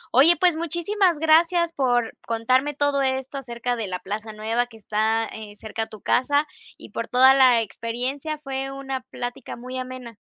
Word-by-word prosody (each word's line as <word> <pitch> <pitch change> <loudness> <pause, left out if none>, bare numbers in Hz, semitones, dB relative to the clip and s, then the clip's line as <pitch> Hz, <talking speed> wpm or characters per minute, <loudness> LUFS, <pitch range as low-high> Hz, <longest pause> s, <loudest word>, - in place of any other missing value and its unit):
Oye, 320 +7 +7
pues, 360 -3 +4
muchísimas 345 +3 +1
gracias 335 +2 +3
por 245 -4 0
contarme 255 +5 +1
todo 285 -1 +1
esto 265 +1 -2
acerca 245 -1 -3
de 225 -3 -3
la 180 -1 -3
plaza 210 +4 -6
nueva 225 +3 -1
que 225 -2 -15
está, 220 +1 0
eh, 215 -1 -9
cerca 220 +1 -6
a - - -7
tu 215 - -12
casa 285 +4 +2 0.3
y - - -13
por - - -4
toda 260 +1 +6
la 255 -3 +5
experiencia. 250 +8 -4
Fue 270 -2 -4
una 270 -1 -5
plática 245 -1 -7
muy 255 +2 -8
amena. 255 -3 -8
255 Hz, 175 wpm, -23 LUFS, 230-285 Hz, 0.3 s, Oye